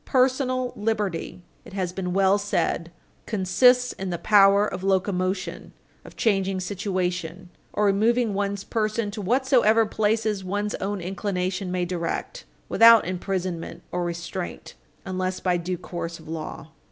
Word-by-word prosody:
"Personal 255 -1 +1
liberty," 205 -5 -2 0.2
it - - -13
has 185 -2 -2
been 180 -1 -3
well 195 +2 +3
said, 170 -4 -1 0.4
"consists 245 +5 +3
in 190 -1 -5
the 175 - -2
power 200 +1 +5
of 190 -3 -5
locomotion, 190 -1 -1 0.3
of - - -13
changing 195 -3 +1
situation, 185 -2 -3 0.2
or 210 - +1
removing 220 +3 +2
one's 200 0 -2
person 215 -1 -1
to 210 +1 -6
whatsoever 230 0 +3
places 215 -1 0
one's 205 +3 -2
own 195 0 -2
inclination 185 0 -2
may 180 -1 0
direct, 175 - -4 0.2
without 230 0 +7
imprisonment 180 -2 -4
or 180 - -1
restraint 175 +1 -5 0.3
unless 185 0 -2
by 180 -1 +1
due 175 +1 -2
course 170 -1 -6
of 160 - -15
law." 160 -1 -6
195 Hz, 135 wpm, -25 LUFS, 180-215 Hz, 0.4 s, without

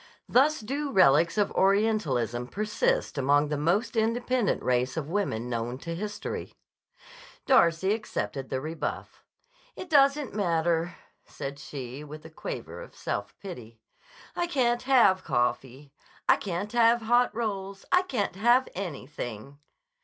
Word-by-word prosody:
Thus 285 +4 +3
do 280 +6 -3
relics 170 - +4
of 205 - +2
Orientalism 160 - +1
persist 210 -5 -1
among 145 +2 +3
the 150 - -1
most 175 +12 0
independent 235 +1 0
race 125 +3 0
of 150 -3 -2
women 125 - -1
known 120 +1 -3
to 165 +5 -6
history. 205 +4 -5 0.9
Darcy 190 - +4
accepted 150 -10 -4
the 130 - -1
rebuff. 155 +4 -5 0.5
"It 365 - -9
doesn't 280 -2 +4
matter," 170 -3 0 0.3
said 140 +1 -7
she, 135 0 -7
with 150 +1 -10
a 160 - -11
quaver 160 - -7
of - - -12
self - - -4
pity. 120 - -9 0.6
"I 345 - 0
can't 245 -7 +1
have 235 -8 +4
coffee. 130 +3 -2 0.3
I - - +6
can't 195 +2 -4
have 235 0 +4
hot 240 +2 +3
rolls. 200 -4 -4
I 360 - +5
can't 250 - -2
have 240 +5 +4
anything." 140 - -6
185 Hz, 130 wpm, -27 LUFS, 140-230 Hz, 0.9 s, I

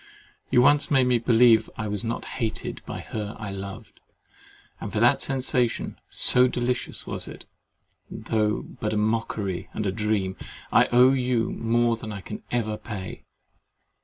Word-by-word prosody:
You 125 - +5
once 145 +2 +4
made 135 -3 +4
me 125 -1 +3
believe 115 -1 +5
I 115 - -3
was 105 +2 -2
not 115 0 -3 0.2
hated 110 -2 -3
by - - -5
her 105 -1 -5
I 105 -3 -6
loved; 100 0 -8 0.8
and - - -6
for - - -1
that - - +4
sensation, 125 -3 0
so 125 +1 +4
delicious 125 0 -2
was - - -3
it, - - -10 0.6
though 105 -1 -1
but 105 0 -4
a - - 0
mockery 105 -3 -1
and 110 - -3
a 95 - +1
dream, 105 -2 -1 0.3
I - - +5
owe 125 +2 +5
you 125 -3 0
more 115 0 +1
than 110 -1 -7
I 100 -2 -6
can - - -7
ever 110 -3 -1
pay. 100 -5 -7
115 Hz, 160 wpm, -25 LUFS, 105-125 Hz, 0.8 s, You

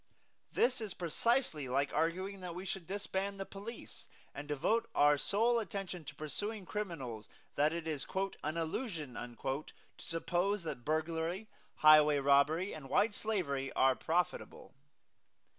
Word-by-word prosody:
This 250 -1 +2
is 210 -4 -4
precisely 175 - +1
like 140 +3 0
arguing 185 +5 0
that 175 -2 -5
we 185 +2 -6
should 190 -3 -4
disband 195 0 -3
the 195 - -3
police 205 +5 -9 0.3
and 145 - -7
devote 150 +11 +1
our 145 0 +6
sole 230 +10 +2
attention 190 -4 -4
to - - -8
persuading 205 +7 -4
criminals 150 - -4 0.2
that 150 +2 +3
it 165 -1 -4
is 150 -4 -3 0.4
"an 155 +2 -2
illusion" 165 - -3
to 130 +4 -4 0.3
suppose 175 +4 0
that 140 -7 -5
burglary, 165 - -1 0.3
highway 155 -1 +7
robbery 140 +7 +3
and 145 -4 -8
white 210 0 +3
slavery 155 -13 -1
are 130 0 +4
profitable. 175 +5 -2
165 Hz, 135 wpm, -34 LUFS, 145-200 Hz, 0.4 s, highway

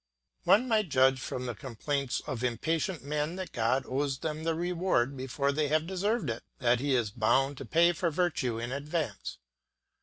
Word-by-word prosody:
One 245 +5 +5
might 215 -6 +2
judge 130 -1 +4
from 125 -1 -4
the 120 - -2
complaints 135 +4 -3
of 125 -1 -4
impatient 160 - -1
men 150 +3 -2
that 185 -1 -5
God 125 +3 +1
owes 135 +1 -1
them 155 +2 -4
the 165 -1 +1
reward 170 -6 +1
before 135 +2 -1
they 150 +1 0
have 155 +2 +2
deserved 195 +2 0
it, 115 - -5 0.2
that 120 -1 +3
he 140 0 +1
is 115 -4 +1
bound 135 +6 +2
to - - -6
pay 170 +1 +4
for 170 0 0
virtue 155 -8 0
in 120 +2 -4
advance. 140 - -3
140 Hz, 180 wpm, -30 LUFS, 130-165 Hz, 0.2 s, One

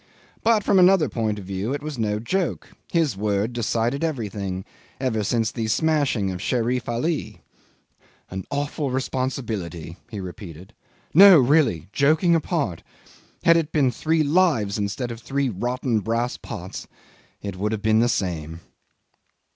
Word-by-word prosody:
But 225 -2 +3
from 195 - +4
another 180 -3 +5
point 110 -2 -2
of 100 - -8
view 100 +7 -2
it 145 - -7
was 150 -4 -5
no 105 -2 0
joke. 180 - -2 0.2
His 160 - +1
word 105 +3 -1
decided 120 +4 -1
everything 100 - -3 0.3
ever 120 -5 0
since 115 +1 0
the 115 -2 -3
smashing 135 -6 +1
of 90 -1 -6
Sherif 120 +2 -1
Ali. 145 +7 -2 0.9
An 95 0 -4
awful 145 0 -2
responsibility," 115 - -3
he 105 -4 -6
repeated. 90 +1 -9 0.4
"No, 195 +1 +9
really 130 - +3
joking 155 +5 +3
apart, 155 - -1 0.6
had 170 0 +6
it 160 -2 -1
been 140 -5 +2
three 160 +6 +1
lives 145 - +2
instead 105 +5 -2
of 115 - -7
three 140 +1 -1
rotten 120 +2 -1
brass 115 +4 -1
pots - - -8 0.6
it 100 -2 -4
would 105 +3 -1
have 110 -2 -3
been 110 0 +4
the 120 +1 +3
same. 85 -5 -3
120 Hz, 145 wpm, -23 LUFS, 100-145 Hz, 0.9 s, No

